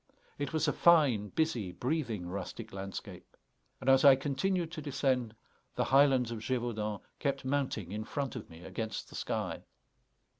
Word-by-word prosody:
It 145 -1 -2
was 160 -1 +1
a 150 - +2
fine, 145 -12 +5
busy, 120 - 0
breathing, 120 - -2
rustic 100 +4 -6
landscape; 95 0 -7 0.4
and - - -8
as 135 0 +6
I 140 -2 +9
continued 160 +6 -1
to 165 -2 -6
descend, 130 -5 0 0.4
the - - +1
highlands 135 -3 +4
of 115 - -4
Gévaudan 110 -4 -2 0.2
kept 140 -2 -1
mounting 130 -9 -1
in 105 +1 -3
front 135 +2 -3
of - - -7
me 85 +1 -12
against 110 +4 -4
the - - -11
sky. - - -2
130 Hz, 155 wpm, -32 LUFS, 110-145 Hz, 0.4 s, I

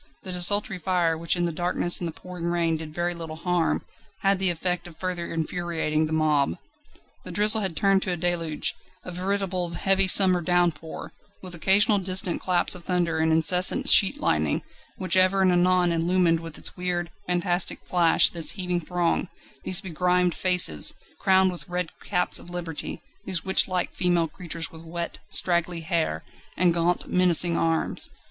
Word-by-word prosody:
The 190 - -7
desultory 185 +1 +2
fire, 175 -3 0
which 165 +2 0
in 175 -1 -1
the 170 - -2
darkness 175 +1 -1
and 175 - -4
the - - -5
pouring 180 +1 -9
rain 170 -1 0
did 155 -1 -7
very 175 +2 -3
little 165 -2 -8
harm, 175 0 -1 0.4
had 195 -1 +1
the 190 -1 +2
effect 180 +1 -3
of 165 -2 -15
further 180 -2 -5
infuriating 160 -2 -2
the - - -8
mob. 150 - 0 0.7
The - - -8
drizzle 210 +4 +5
had 190 -5 -4
turned 195 -1 +2
to 185 - -3
a 175 - -3
deluge, 170 -2 -2 0.3
a 180 - -8
veritable 185 -1 -2
heavy 195 +1 +2
summer 185 -2 +7
downpour, 170 -2 -2 0.3
with 180 -1 -6
occasional 200 +4 +2
distant 185 -1 0
claps 180 -2 +2
of 180 - -5
thunder 175 -3 0
and 160 0 +1
incessant 180 - +3
sheet 215 +8 +5
lightning, - - -1 0.3
which 185 -1 -2
ever 185 +1 +3
and 185 - +3
anon 180 0 +2
illumined 170 0 +1
with 165 -1 -10
its - - -3
weird, 175 -1 -3 0.2
fantastic 175 0 0
flash 170 -2 +3
this 165 -2 +1
heaving 180 -3 -2
throng, 175 +2 -2 0.3
these 185 0 +1
begrimed 180 -1 0
faces, 180 - +3 0.2
crowned 190 0 +3
with 175 +1 -11
red 180 -1 -3 0.2
caps 180 -3 +1
of - - -14
Liberty, 175 -3 -6 0.2
these 185 -3 -1
witchlike 185 -1 +1
female 175 -2 0
creatures 165 0 -5
with 160 - -12
wet, 170 +1 -6
straggly 170 -1 0
hair 160 - -2 0.3
and 175 0 +2
gaunt, 170 +1 0
menacing 175 -1 +4
arms. 165 -1 -1
175 Hz, 165 wpm, -24 LUFS, 165-185 Hz, 0.7 s, summer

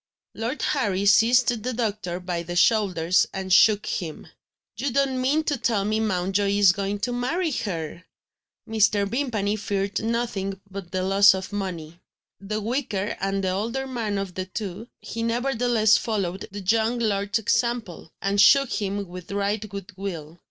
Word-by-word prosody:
Lord 235 +6 -3
Harry 200 -8 0
seized 230 +5 +5
the 250 +3 -3
doctor 210 -6 -2
by 180 -2 -3
the 175 +1 -6
shoulders, 185 -4 +3
and 190 -1 -2
shook 215 0 +5
him: 165 -5 -4 0.5
"You 280 - -2
don't 265 0 +1
mean 290 +5 +2
to 295 -2 -1
tell 205 -4 +1
me 215 +1 0
Mountjoy 200 -1 0
is 200 -3 +6
going 200 +1 -3
to 245 - -1
marry 315 +8 -1
her?" 170 - -4 0.6
Mr. 215 -2 +2
Vimpany 220 -4 -1
feared 200 -1 -2
nothing 220 -4 -2
but 195 -3 -8
the 185 -1 -1
loss 195 +1 +6
of 190 +2 -6
money. 175 -5 -5 0.4
The 210 +2 -3
weaker 215 -4 -2
and 195 0 -1
the 190 - +1
older 230 +8 -2
man 230 -6 -3
of 195 -2 -4
the 185 +1 -4
two, 200 +2 -6
he 230 - -5
nevertheless 235 -2 +2
followed 195 -4 -3
the 205 +1 -7
young 225 +5 +1
lord's 200 -3 0
example, 225 -6 -1
and 200 +1 +2
shook 275 +3 +6
him 200 -1 -2
with 180 0 -10
right 205 +1 -1
good 200 -1 -8
will. 170 -4 -6
205 Hz, 160 wpm, -24 LUFS, 190-230 Hz, 0.6 s, is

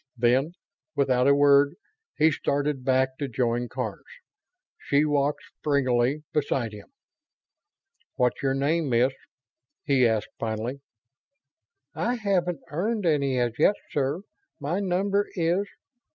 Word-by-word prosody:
Then, 130 +7 +2 0.4
without 130 -2 +2
a 140 - +6
word, 145 +1 +5 0.4
he 160 +1 +5
started 140 -1 -1
back 130 0 +1
to 140 - -2
join 120 -1 -1
Karns. 125 -6 -4 0.8
She 145 +2 +2
walked 145 -1 0 0.2
springily 135 0 +1
beside 135 -6 0
him. 105 -1 -11 1.3
"What's 125 -1 +1
your 135 -1 +1
name, 150 +2 0
Miss?" 125 +2 +3 0.7
he 135 -4 +3
asked, 110 -2 -1
finally. 115 +5 -3 1.1
"I 245 - -1
haven't 180 - 0
earned 205 +6 -1
any 140 -5 +2
as 120 0 -1
yet, 200 +6 +5 0.2
sir. 145 +4 -1 0.4
My 150 +7 -2
number 200 +1 0
is 175 +3 +1
140 Hz, 120 wpm, -26 LUFS, 125-160 Hz, 1.3 s, a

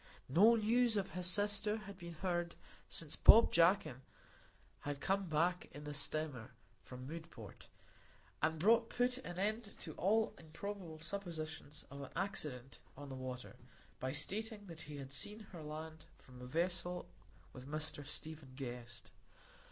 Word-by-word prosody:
No 205 - +7
news 230 +1 +3
of 195 -1 -1
his 180 -1 0
sister 205 +2 +3
had 200 -2 -8
been 170 -1 -7
heard 175 0 -1 0.3
since 160 -3 -2
Bob 230 - +9
Jakin 170 -6 +4 0.8
had 145 -1 -4
come 195 +2 +1
back 170 +4 +1
in 145 +2 -8
the 150 0 -5
steamer 145 -4 -3 0.3
from 125 0 -8
Mudport, 160 - -9 0.7
and 160 0 +2 0.3
put 250 +1 +1
an 180 -9 -7
end 215 +2 -1
to 155 - -6
all 220 +4 +3
improbable 170 +1 -6
suppositions 160 -5 -4
of 140 0 -7
an 140 - -6
accident 135 -10 -3 0.2
on 145 0 -7
the 135 - -5
water 130 -1 -6 0.4
by 130 +1 -1
stating 205 - 0
that 165 -4 -9
he 145 0 -7
had 135 -1 -7
seen 210 +9 -1
her 170 -4 -7
land 155 +1 -7
from 125 -1 -14
a 125 - -7
vessel 175 +4 0 0.5
with 130 +1 -9
Mr 155 -1 0
Stephen 150 -1 -5
Guest. 120 -2 -7
160 Hz, 145 wpm, -38 LUFS, 145-195 Hz, 0.8 s, Bob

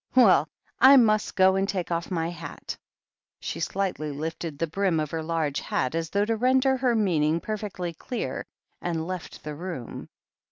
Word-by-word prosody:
"Well, 190 - +6 0.3
I 270 +2 +9
must 215 -4 +3
go 190 -1 +5
and 195 +1 0
take 180 -3 -2
off 170 0 -1
my 165 -2 -1
hat" 165 -4 -7 0.6
She - - -5
slightly 190 -6 -2
lifted 160 +1 -5
the 165 - 0
brim 175 0 0
of 155 -2 -2
her 165 - -2
large 160 -3 -1
hat, 130 - -1
as 165 -1 -2
though 200 +3 +1
to 225 +1 0
render 260 +3 +3
her 255 -2 +1
meaning 165 -7 +2
perfectly 200 -4 -4
clear, 240 +9 -4 0.3
and 165 -2 -2
left 185 -1 -6
the 150 - -5
room. 165 -6 -6
175 Hz, 170 wpm, -26 LUFS, 160-210 Hz, 0.6 s, I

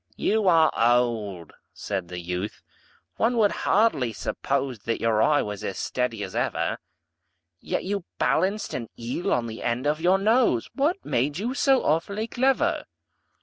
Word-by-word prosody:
"You 215 -1 +1
are 165 -3 +5
old," 115 -7 +1 0.2
said 95 -4 -4
the 90 - -7
youth, 90 +3 -5 0.5
"one 235 +2 +1
would 210 -3 +4
hardly 190 - +1
suppose 135 +3 -2
That 115 +3 -2
your 110 -1 +2
eye 145 +5 +3
was 105 -2 -6
as 95 - -4
steady 120 -4 -2
as 95 - -7
ever; - - -1 0.8
Yet - - -3
you 200 -1 -3
balanced 200 +3 0
an 115 -3 -4
eel 120 +9 -3
on 120 - +1
the 110 -1 -7
end 120 +3 -1
of 150 +2 0
your 180 +3 +4
nose 215 - +2
What 310 +8 0
made 145 +5 0
you 230 +7 -2
so 270 -1 +3
awfully 200 +8 0
clever?" 260 +3 +1
135 Hz, 155 wpm, -25 LUFS, -, 0.8 s, are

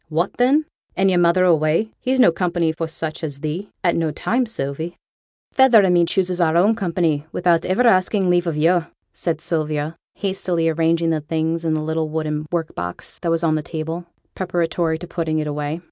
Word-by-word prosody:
'What 170 +4 0
then? 275 +5 +3 0.3
and 190 0 +3
yo'r 180 - +3
mother 175 +1 +4
away. 165 +5 +2
He's 260 +1 0
no 245 - +7
company 170 -1 0
for 165 0 -4
such 160 0 -4
as 140 -3 -5
thee, 160 +6 -4
at 175 - +2
no 165 -1 0
time, 245 +10 -1
Sylvie.' 160 -2 -4 0.6
'Feyther 260 -5 +6
and 185 -2 +3
me 175 -1 +4
chooses 180 0 0
our 165 -1 +3
own 200 +6 +4
company, 170 -7 -1
without 175 -2 +1
iver 190 +7 +2
asking 190 -2 +3
leave 175 0 +2
o' - - +1
yo',' 165 +2 +2 0.3
said 165 -3 -2
Sylvia, 155 -2 -2 0.2
hastily 180 -4 -1
arranging 165 +1 +1
the 155 -1 0
things 160 +2 -2
in 160 -1 0
the 155 - -2
little 160 0 -1
wooden 155 -1 -3
work 165 -2 -2
box 90 0 -6
that 170 - -1
was 165 0 0
on 160 -2 +2
the 155 - 0
table, 160 +3 -5 0.3
preparatory 170 -2 -1
to 175 - -8
putting 160 -2 -2
it 155 - -1
away. 150 +2 -3
165 Hz, 195 wpm, -21 LUFS, 160-180 Hz, 0.6 s, no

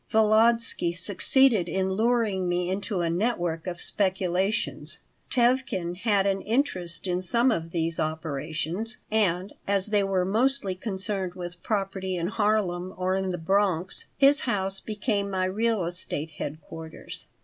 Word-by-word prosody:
Volodsky 220 -3 +3
succeeded 205 +4 +3
in 190 0 0
luring 215 -3 +1
me 175 +1 0
into 195 -1 -2
a 170 - 0
network 175 -4 -1
of 175 -1 -4
speculations 190 +1 0 0.3
Tevkin 240 -8 +1
had 200 -1 +2
an 195 -1 +1
interest 190 -10 -1
in 180 -1 0
some 235 +7 +3
of 165 -6 -2
these 165 -1 -1
operations, 160 - -3
and, 195 -3 +1
as 200 0 +1
they 205 -1 +3
were 190 -2 +1
mostly 225 +1 +1
concerned 190 -1 -3
with 175 -1 -7
property 195 -3 -2
in 170 +1 -1
Harlem 200 -4 0
or 185 0 0
in 190 0 0
the 180 - -2
Bronx, 185 0 0
his 280 +1 +6
house 195 -5 -1
became 205 -1 -2
my 190 -1 0
real 215 0 +1
estate 165 -3 -3
headquarters. 155 +2 -8
190 Hz, 140 wpm, -27 LUFS, 175-215 Hz, 0.3 s, his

